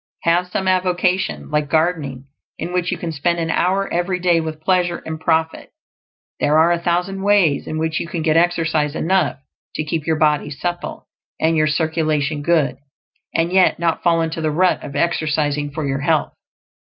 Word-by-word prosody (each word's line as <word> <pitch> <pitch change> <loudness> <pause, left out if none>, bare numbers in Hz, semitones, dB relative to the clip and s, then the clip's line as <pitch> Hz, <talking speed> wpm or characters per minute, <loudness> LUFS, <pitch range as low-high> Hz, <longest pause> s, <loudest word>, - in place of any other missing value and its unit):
Have 175 +2 +2
some 190 +1 -3
avocation 185 -1 0
like 150 -1 0
gardening 155 -5 0 0.3
in 175 - -5
which 180 -1 0
you - - -2
can 170 - -4
spend 165 +3 0
an 165 -1 -1
hour 190 +4 +1
every 175 +2 0
day 175 -2 +3
with 160 -1 -5
pleasure 175 +1 0
and 160 0 -5
profit; 160 0 0 0.7
there 150 +1 +3
are 165 +2 +5
a 170 - +1
thousand 180 +3 -1
ways 195 -7 +2
in 155 - -3
which 160 0 -1
you - - -4
can 170 -1 -4
get 155 -1 +2
exercise 165 -3 +1
enough 175 -6 +1 0.4
to 155 - -1
keep 155 0 -3
your 160 - +2
body 150 -1 +2
supple 175 +5 -5 0.3
and 160 +1 +2
your 155 -1 +3
circulation 155 -2 0
good, 145 -5 +1 0.6
and 165 +2 +1
yet 190 -1 +4
not 165 -1 0
fall 170 -1 +2
into 160 0 -3
the 155 - 0
rut 180 +4 +1
of 140 0 -8
"exercising 150 -2 0
for 145 0 -4
your 135 0 -1
health." 155 +1 +1
165 Hz, 180 wpm, -20 LUFS, 155-175 Hz, 0.7 s, are